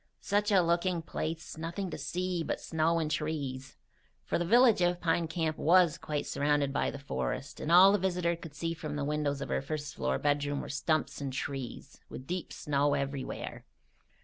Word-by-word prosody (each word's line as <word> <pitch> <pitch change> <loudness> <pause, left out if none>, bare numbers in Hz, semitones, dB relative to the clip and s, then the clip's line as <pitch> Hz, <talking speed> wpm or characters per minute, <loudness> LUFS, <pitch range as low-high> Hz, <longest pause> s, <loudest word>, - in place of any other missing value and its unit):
"Such 205 +1 +1
a 190 -3 +5
looking 170 0 +1
place! 160 0 -5
Nothing 170 +3 -4
to - - -4
see 180 -1 -2
but - - -2
snow 165 +1 +1
and 155 -2 -1
trees," 145 -4 -3 0.5
for - - 0
the 175 - 0
village 235 +1 +5
of 175 0 +2
Pine 165 -1 +1
Camp 160 -1 -2
was 175 -1 +4
quite 150 -1 -3
surrounded 145 -1 +1
by - - +1
the - - -6
forest 140 -1 -4
and 160 - -2
all 185 +3 +9
the 205 - +2
visitor 180 -2 0
could 165 -3 -11
see 165 +3 -2
from 155 -2 -5
the 145 -1 -2
windows 145 -1 -1
of - - -4
her - - 0
first 145 +1 -4
floor 65 +1 -1
bedroom 145 0 0
were - - -6
stumps 145 +1 -1
and 140 -1 -3
trees, 130 -1 -5
with 130 - -8
deep 180 +3 -4
snow 145 0 +1
everywhere. 140 -1 -4
155 Hz, 190 wpm, -31 LUFS, 145-175 Hz, 0.5 s, all